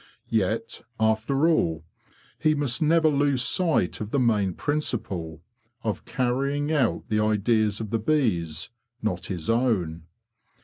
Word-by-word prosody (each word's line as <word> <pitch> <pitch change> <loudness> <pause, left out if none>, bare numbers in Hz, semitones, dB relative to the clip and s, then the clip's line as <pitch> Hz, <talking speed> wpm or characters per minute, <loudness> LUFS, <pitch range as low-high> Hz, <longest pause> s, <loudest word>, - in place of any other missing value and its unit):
Yet, 115 +2 -1 0.2
after 110 +7 +2
all, 80 - +1 0.5
he 155 0 +3
must 145 -3 0
never 160 +1 +4
lose 140 -3 +2
sight 160 - +1
of 105 - -4
the 140 - 0
main 105 -7 +2
principle, 95 - -3 0.4
of - - -3
carrying 140 +4 -1
out 140 -7 +1
the 105 -1 +1
ideas 110 0 +2
of 110 -2 -5
the 115 - +1
bees, 105 - 0 0.3
not 90 -4 -2
his 85 -5 -5
own. 95 -10 0
115 Hz, 130 wpm, -25 LUFS, 100-140 Hz, 0.5 s, never